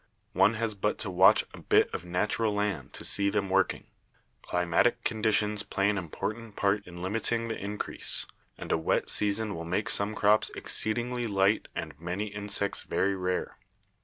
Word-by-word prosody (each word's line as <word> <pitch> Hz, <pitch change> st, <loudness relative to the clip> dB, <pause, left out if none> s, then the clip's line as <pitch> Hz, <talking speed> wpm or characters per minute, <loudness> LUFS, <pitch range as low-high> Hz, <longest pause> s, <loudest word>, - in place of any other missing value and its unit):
One 115 Hz, -, +4 dB
has 110 Hz, -1 st, -1 dB
but 105 Hz, +1 st, -1 dB
to 100 Hz, -, -1 dB
watch 95 Hz, +2 st, +5 dB
a -, -, -10 dB
bit -, -, +3 dB
of -, -, -4 dB
natural 105 Hz, +5 st, 0 dB
land 100 Hz, -10 st, -2 dB
to -, -, -8 dB
see 100 Hz, 0 st, +4 dB
them 100 Hz, -2 st, -1 dB
working. 95 Hz, 0 st, +1 dB, 0.6 s
Climatic 90 Hz, +8 st, +1 dB
conditions 105 Hz, -2 st, +1 dB
play 100 Hz, -1 st, 0 dB
an 105 Hz, -, -3 dB
important 105 Hz, +6 st, -5 dB
part 100 Hz, 0 st, 0 dB
in 90 Hz, 0 st, -9 dB
limiting 115 Hz, +4 st, -1 dB
the 115 Hz, -, -2 dB
increase, 105 Hz, +1 st, 0 dB, 0.3 s
and -, -, -6 dB
a -, -, +2 dB
wet 80 Hz, -, +1 dB
season 105 Hz, +1 st, +2 dB
will 85 Hz, -, -6 dB
make 90 Hz, +5 st, -2 dB
some 100 Hz, +2 st, +1 dB
crops 105 Hz, +1 st, +3 dB
exceedingly 120 Hz, +2 st, -2 dB
light 100 Hz, 0 st, +2 dB
and 80 Hz, -1 st, -5 dB
many 90 Hz, +5 st, -3 dB
insects 100 Hz, -1 st, -1 dB
very 100 Hz, 0 st, 0 dB
rare. 90 Hz, -1 st, -3 dB
100 Hz, 165 wpm, -28 LUFS, 95-110 Hz, 0.6 s, watch